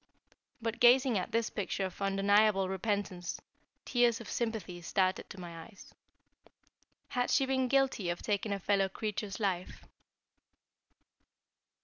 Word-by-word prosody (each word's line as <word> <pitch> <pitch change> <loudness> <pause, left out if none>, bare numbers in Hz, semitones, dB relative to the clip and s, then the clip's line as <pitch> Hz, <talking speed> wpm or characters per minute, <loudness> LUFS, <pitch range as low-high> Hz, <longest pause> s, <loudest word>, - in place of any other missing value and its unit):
But 225 0 -2
gazing 245 -2 +5
at 180 - -5
this 230 0 0
picture 195 -1 -2
of 185 +1 -8
undeniable 195 0 +3
repentance, 190 -2 -2 0.5
tears 240 -2 +2
of 230 - -9
sympathy 220 -7 -3
started 185 +2 0
to 195 - -9
my 170 -2 -8
eyes. 210 -4 -16 1.2
Had 245 -2 0
she 270 - +3
been 260 -1 +1
guilty 270 -8 +1
of 175 - -3
taking 205 0 -1
a 200 - 0
fellow 195 0 +1
creature's 210 -1 -4
life? 185 -4 -2
205 Hz, 125 wpm, -32 LUFS, 190-230 Hz, 1.2 s, gazing